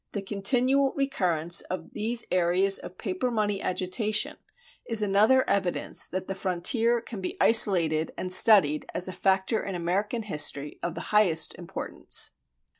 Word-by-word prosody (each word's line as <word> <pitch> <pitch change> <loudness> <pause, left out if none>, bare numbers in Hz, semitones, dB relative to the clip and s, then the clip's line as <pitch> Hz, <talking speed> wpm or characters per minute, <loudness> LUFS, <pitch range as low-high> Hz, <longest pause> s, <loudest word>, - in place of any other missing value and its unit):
The 205 - -4
continual 255 +7 +1
recurrence 175 - 0
of 185 - -7
these 230 +3 +1
areas 185 +2 +2
of 185 - -11
paper 195 +4 -3
money 210 -4 -2
agitation 210 +4 -1 0.5
is 225 -2 0
another 215 +6 +3
evidence 190 -3 -1
that 185 +1 -5
the 195 - -3
frontier 215 +6 +1
can 220 -3 -9
be 185 - -5
isolated 170 -8 +4
and 185 0 0
studied 185 -7 +5
as 180 - -2
a 185 - -6
factor 190 +3 0
in 195 - -5
American 195 +7 -2
history 150 -6 -3
of 170 -1 -4
the 170 - -8
highest 175 -7 +2
importance. 175 0 -4
195 Hz, 145 wpm, -26 LUFS, 180-220 Hz, 0.5 s, studied